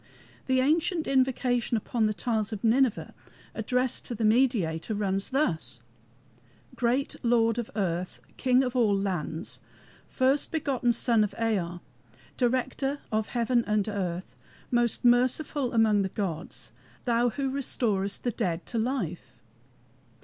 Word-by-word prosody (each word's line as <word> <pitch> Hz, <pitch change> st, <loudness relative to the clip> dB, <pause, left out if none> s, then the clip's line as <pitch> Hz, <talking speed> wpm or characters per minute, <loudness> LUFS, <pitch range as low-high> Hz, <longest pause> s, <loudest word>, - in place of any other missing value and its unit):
The 260 Hz, -1 st, +3 dB
ancient 320 Hz, +4 st, +1 dB
invocation 255 Hz, -3 st, +1 dB
upon 220 Hz, +1 st, 0 dB
the 215 Hz, -, 0 dB
tiles 220 Hz, +2 st, -1 dB
of 215 Hz, -1 st, -5 dB
Nineveh 240 Hz, +1 st, +2 dB, 0.4 s
addressed 250 Hz, +3 st, -1 dB
to 240 Hz, -, -4 dB
the 220 Hz, -, -1 dB
Mediator 215 Hz, -6 st, +2 dB
runs 195 Hz, -1 st, -1 dB
thus: 160 Hz, -, -1 dB, 1.0 s
"Great 250 Hz, +3 st, 0 dB
Lord 230 Hz, -1 st, +3 dB
of 235 Hz, -, -4 dB
earth! 180 Hz, -3 st, -2 dB, 0.2 s
King 255 Hz, 0 st, +3 dB
of 250 Hz, -1 st, -3 dB
all 215 Hz, -5 st, +3 dB
lands, 180 Hz, -4 st, -3 dB, 0.5 s
First 270 Hz, +2 st, +1 dB
begotten 275 Hz, -6 st, +1 dB
Son 235 Hz, -1 st, +2 dB
of 205 Hz, -1 st, -3 dB
Ea, 180 Hz, -6 st, -1 dB, 0.5 s
Director 260 Hz, +3 st, 0 dB
of 215 Hz, -1 st, 0 dB
heaven 240 Hz, 0 st, +1 dB
and 210 Hz, -1 st, +1 dB
earth, 185 Hz, -4 st, -3 dB, 0.4 s
Most 240 Hz, -1 st, +1 dB
merciful 255 Hz, +2 st, +2 dB
among 220 Hz, -3 st, +3 dB
the 190 Hz, -, -1 dB
gods, 180 Hz, -5 st, -5 dB, 0.3 s
Thou 240 Hz, 0 st, +2 dB
who 270 Hz, +3 st, -2 dB
restorest 215 Hz, -7 st, -1 dB
the 245 Hz, -, 0 dB
dead 175 Hz, -5 st, -2 dB
to 235 Hz, -, -3 dB
life." 220 Hz, -, -3 dB
230 Hz, 130 wpm, -28 LUFS, 200-255 Hz, 1.0 s, The